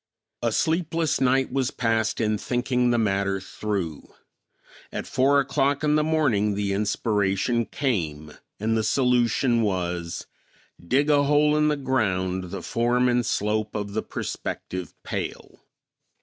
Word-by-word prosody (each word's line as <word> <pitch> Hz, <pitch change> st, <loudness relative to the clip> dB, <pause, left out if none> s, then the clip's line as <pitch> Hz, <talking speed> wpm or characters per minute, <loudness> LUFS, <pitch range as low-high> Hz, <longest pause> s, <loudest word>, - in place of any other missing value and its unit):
A 120 Hz, -1 st, +1 dB
sleepless 165 Hz, +2 st, 0 dB
night 130 Hz, 0 st, +2 dB
was 135 Hz, -2 st, +1 dB
passed 115 Hz, -2 st, 0 dB
in 110 Hz, -2 st, +1 dB
thinking 125 Hz, 0 st, 0 dB
the 120 Hz, -, +2 dB
matter 100 Hz, -3 st, +1 dB
through. 95 Hz, -5 st, -4 dB, 0.8 s
At -, -, -4 dB
four 140 Hz, +3 st, +3 dB
o'clock 140 Hz, +1 st, +1 dB
in 150 Hz, 0 st, +3 dB
the 155 Hz, 0 st, +3 dB
morning 125 Hz, -11 st, +1 dB
the 100 Hz, -1 st, -1 dB
inspiration 105 Hz, +2 st, 0 dB
came, 80 Hz, -, -2 dB, 0.3 s
and 110 Hz, +2 st, 0 dB
the 110 Hz, -, +1 dB
solution 125 Hz, -1 st, +2 dB
was: 90 Hz, -4 st, -2 dB, 0.6 s
Dig 140 Hz, -, +2 dB
a 145 Hz, -1 st, +4 dB
hole 150 Hz, +1 st, +4 dB
in 150 Hz, 0 st, +3 dB
the 150 Hz, -1 st, +1 dB
ground 95 Hz, -9 st, 0 dB
the 90 Hz, 0 st, -7 dB
form 120 Hz, +2 st, +1 dB
and 120 Hz, 0 st, +2 dB
slope 105 Hz, -1 st, -1 dB
of 100 Hz, -1 st, -3 dB
the 110 Hz, -, 0 dB
prospective 90 Hz, -1 st, -5 dB
pail. -, -, -5 dB
115 Hz, 135 wpm, -25 LUFS, 100-135 Hz, 0.8 s, a